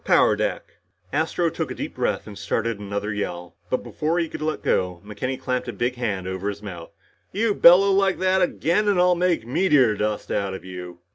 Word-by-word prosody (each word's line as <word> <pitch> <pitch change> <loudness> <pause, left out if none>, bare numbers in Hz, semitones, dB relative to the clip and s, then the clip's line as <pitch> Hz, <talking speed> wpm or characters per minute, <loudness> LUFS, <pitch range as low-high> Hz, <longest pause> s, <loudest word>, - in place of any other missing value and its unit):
Power - - +4
deck." - - -3 0.4
Astro 160 +2 0
took - - -3
a - - -5
deep - - -5
breath - - -1
and 105 - -9
started 105 +2 -2
another 100 +1 -3
yell, 90 -4 -5
but 130 - -1
before 160 +2 -2
he 170 -1 +1
could - - -7
let 155 0 -2
go, 90 -2 0
McKenny 125 +6 -4
clamped 125 -1 -2
a - - -4
big 120 +1 -1
hand 105 -7 -3
over 95 +2 -3
his 100 +1 -7
mouth. 85 -5 -8 0.4
"You 215 +1 +1
bellow 190 +2 +7
like 195 -1 +2
that 185 0 +2
again 180 +3 +1
and 200 -3 +3
I'll 180 0 +5
make 175 -7 +1
meteor 130 - +3
dust 105 0 -2
out 95 -1 -1
of 95 - -10
you!" 90 -1 -8
120 Hz, 205 wpm, -23 LUFS, -, 0.4 s, bellow